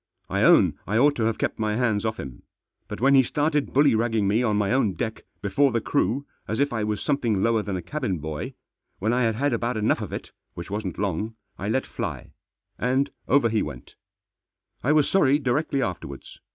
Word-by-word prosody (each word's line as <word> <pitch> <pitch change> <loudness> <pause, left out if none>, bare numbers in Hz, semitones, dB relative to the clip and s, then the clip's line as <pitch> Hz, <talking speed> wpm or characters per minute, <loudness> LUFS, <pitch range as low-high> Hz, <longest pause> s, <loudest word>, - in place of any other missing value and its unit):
I - - +1
own - - +5
I 105 - +1
ought 145 +4 +4
to 115 - +1
have 115 -1 0
kept - - -2
my 105 -1 0
hands 115 -3 +1
off 110 0 -3
him. 65 -3 -8 0.5
But - - -6
when 135 +4 +4
he 135 - +8
started 145 +3 0
bullyragging 115 -6 +3
me 105 +4 +2
on 110 -4 +1
my 105 0 +1
own 120 -7 +2
deck, 110 +5 -4 0.2
before 135 +8 +3
the 115 - +1
crew, 120 +6 0 0.2
as 110 - -2
if 140 -2 +1
I 110 -2 -1
was 105 0 -2
something 120 -9 +1
lower 115 -1 +2
than 100 -2 -4
a 90 - -6
cabin 125 - -2
boy, 80 -1 -5 0.4
when 110 +4 0
I 125 - +2
had 115 -2 +2
had 140 +3 0
about 120 0 -1
enough 105 - +1
of - - -5
it, - - -6 0.2
which 85 +3 -7
wasn't 100 -3 -3
long, 105 +3 -2 0.2
I 100 - -3
let 130 +4 0
fly, - - -5 0.5
and 130 +3 +1 0.2
over 135 -3 +4
he 110 -1 +1
went 70 -5 -7 0.9
I 140 - +2
was 150 -2 +4
sorry 145 -7 +4
directly 140 0 0
afterwards. 85 - -6
115 Hz, 205 wpm, -25 LUFS, 105-135 Hz, 0.9 s, he